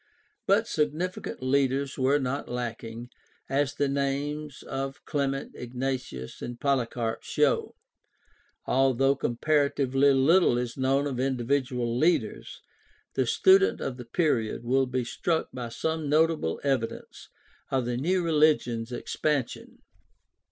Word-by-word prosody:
But 210 Hz, +4 st, +3 dB
significant 155 Hz, 0 st, -2 dB
leaders 135 Hz, +1 st, +1 dB
were 135 Hz, +2 st, +3 dB
not 140 Hz, 0 st, -3 dB
lacking, 120 Hz, -1 st, -5 dB, 0.4 s
as 140 Hz, +1 st, 0 dB
the 145 Hz, -, +1 dB
names 140 Hz, +1 st, -2 dB
of 135 Hz, +1 st, -5 dB
Clement, 140 Hz, -2 st, -2 dB
Ignatius, 125 Hz, -, -5 dB
and 120 Hz, 0 st, -6 dB
Polycarp 120 Hz, -4 st, -1 dB
show. -, -, +1 dB, 0.9 s
Although 135 Hz, +1 st, +3 dB
comparatively 140 Hz, +1 st, +2 dB
little 135 Hz, +1 st, +4 dB
is 120 Hz, -1 st, -3 dB
known 135 Hz, +1 st, +1 dB
of 135 Hz, -4 st, -3 dB
individual 125 Hz, -2 st, 0 dB
leaders, 165 Hz, +8 st, 0 dB, 0.5 s
the -, -, 0 dB
student 390 Hz, +1 st, +4 dB
of 125 Hz, -, -4 dB
the 125 Hz, -, -8 dB
period 115 Hz, -5 st, 0 dB
will 130 Hz, +2 st, +2 dB
be 125 Hz, 0 st, -1 dB
struck 160 Hz, +7 st, -1 dB
by 125 Hz, -2 st, -5 dB
some 160 Hz, +4 st, -2 dB
notable 155 Hz, -, +2 dB
evidences 135 Hz, -5 st, -3 dB, 0.4 s
of 130 Hz, -2 st, 0 dB
the 120 Hz, 0 st, -1 dB
new 175 Hz, +8 st, +1 dB
religion's 150 Hz, -8 st, +2 dB
expansion. 140 Hz, +1 st, -3 dB
135 Hz, 115 wpm, -27 LUFS, 125-145 Hz, 0.9 s, little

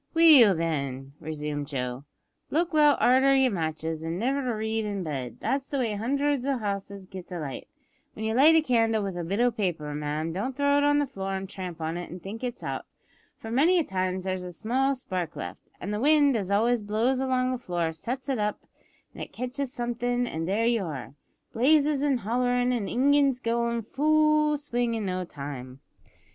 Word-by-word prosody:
"Well, 295 Hz, -, +8 dB
then," 140 Hz, -5 st, -3 dB
resumed 150 Hz, -2 st, -4 dB
Joe, 125 Hz, -1 st, -4 dB, 0.4 s
"look 335 Hz, +2 st, 0 dB
well 295 Hz, -2 st, +5 dB
arter 265 Hz, +2 st, +5 dB
yer 265 Hz, -2 st, +4 dB
matches, 160 Hz, -2 st, -3 dB
an' 165 Hz, +1 st, -3 dB
niver 255 Hz, +1 st, -1 dB
read 220 Hz, +1 st, -1 dB
in 200 Hz, -3 st, -3 dB
bed; 135 Hz, -6 st, -5 dB
that's 275 Hz, 0 st, -1 dB
the 280 Hz, -, -3 dB
way 235 Hz, -5 st, 0 dB
hundreds 275 Hz, +5 st, 0 dB
o' 275 Hz, 0 st, 0 dB
houses 200 Hz, -2 st, -4 dB
get 185 Hz, -1 st, -10 dB
a 180 Hz, -, -4 dB
light. 140 Hz, -4 st, -6 dB, 0.5 s
When 220 Hz, -, -5 dB
you 220 Hz, -, 0 dB
light 295 Hz, +7 st, +6 dB
a 320 Hz, -, +5 dB
candle 225 Hz, -5 st, +2 dB
with 195 Hz, -2 st, -4 dB
a 175 Hz, -, -3 dB
bit 195 Hz, +6 st, -2 dB
o' 245 Hz, 0 st, +4 dB
paper, 175 Hz, -9 st, -2 dB
ma'am, 150 Hz, +2 st, -3 dB
don't 250 Hz, +8 st, -3 dB
throw 285 Hz, 0 st, +3 dB
it -, -, +1 dB
on 290 Hz, 0 st, +4 dB
the 290 Hz, -, +2 dB
floor 195 Hz, -7 st, -5 dB
an' 190 Hz, 0 st, -3 dB
tramp 185 Hz, -3 st, -7 dB
on 160 Hz, +2 st, -2 dB
it 175 Hz, -, -6 dB
an' 180 Hz, -, -8 dB
think 200 Hz, +7 st, -8 dB
it's 245 Hz, -1 st, -4 dB
out, -, -, -4 dB, 0.5 s
for 225 Hz, -, -8 dB
many 315 Hz, +10 st, +4 dB
a 340 Hz, -, +3 dB
time 185 Hz, -5 st, -2 dB
there's 185 Hz, 0 st, -3 dB
a 180 Hz, -, -6 dB
small 260 Hz, +9 st, 0 dB
spark 185 Hz, -9 st, -4 dB
left, 90 Hz, +3 st, -8 dB
an' 195 Hz, -, -5 dB
the 210 Hz, -, -2 dB
wind 290 Hz, 0 st, +4 dB
as 200 Hz, -4 st, -2 dB
always 225 Hz, +4 st, +2 dB
blows 220 Hz, +5 st, 0 dB
along 255 Hz, -1 st, +1 dB
the 255 Hz, -, -3 dB
floor 175 Hz, -6 st, -2 dB
sets 250 Hz, -, -5 dB
it 265 Hz, -4 st, -1 dB
up 210 Hz, 0 st, -1 dB, 0.5 s
an' -, -, -9 dB
it -, -, -6 dB
kitches 250 Hz, +3 st, -3 dB
somethin', 245 Hz, -1 st, -1 dB
and 165 Hz, -7 st, -4 dB
there 210 Hz, +4 st, +1 dB
you 230 Hz, -3 st, +2 dB
are 140 Hz, -6 st, -6 dB, 0.4 s
blazes 290 Hz, +3 st, +3 dB
an' 285 Hz, -3 st, +2 dB
hollerin' 245 Hz, +3 st, +1 dB
an' 220 Hz, -5 st, -1 dB
ingins 275 Hz, 0 st, +3 dB
goin' 235 Hz, -1 st, -1 dB
full 305 Hz, +3 st, +3 dB
swing 245 Hz, -5 st, -1 dB
in 220 Hz, -2 st, -3 dB
no 185 Hz, -1 st, -2 dB
time. 140 Hz, -5 st, -8 dB
225 Hz, 200 wpm, -27 LUFS, 180-265 Hz, 0.5 s, Well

